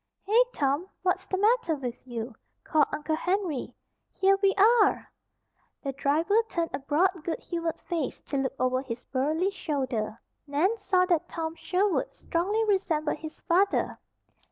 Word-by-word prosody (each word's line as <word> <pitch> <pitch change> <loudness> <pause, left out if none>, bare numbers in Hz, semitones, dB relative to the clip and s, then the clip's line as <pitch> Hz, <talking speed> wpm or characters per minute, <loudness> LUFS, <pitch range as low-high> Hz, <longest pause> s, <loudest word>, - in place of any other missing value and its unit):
"Hey, 435 +5 +4
Tom! 285 - 0 0.2
What's 375 0 0
the 380 - -1
matter 420 -5 +3
with 255 -2 -6
you?" 235 0 -5 0.3
called 305 -2 +3
Uncle 310 +1 -1
Henry. 360 -4 -1 0.4
"Here 390 0 +3
we 390 -1 +3
are!" 420 0 +4 0.8
The 275 - -1
driver 315 - +2
turned 335 -1 -1
a - - -2
broad, 325 +5 +1
good 330 - -2
humored 335 -2 -3
face 325 -6 -3
to 280 - -4
look 270 0 -1
over 255 0 +1
his 245 -2 -6
burly 310 +8 0
shoulder. 260 - -2 0.3
Nan 315 +10 +2
saw 385 -4 +2
that 345 -4 +1
Tom 325 -1 -3
Sherwood 375 +3 0
strongly 405 +7 0
resembled 335 -8 +1
his 315 -1 -9
father. 385 +4 +1
330 Hz, 150 wpm, -28 LUFS, 280-385 Hz, 0.8 s, Hey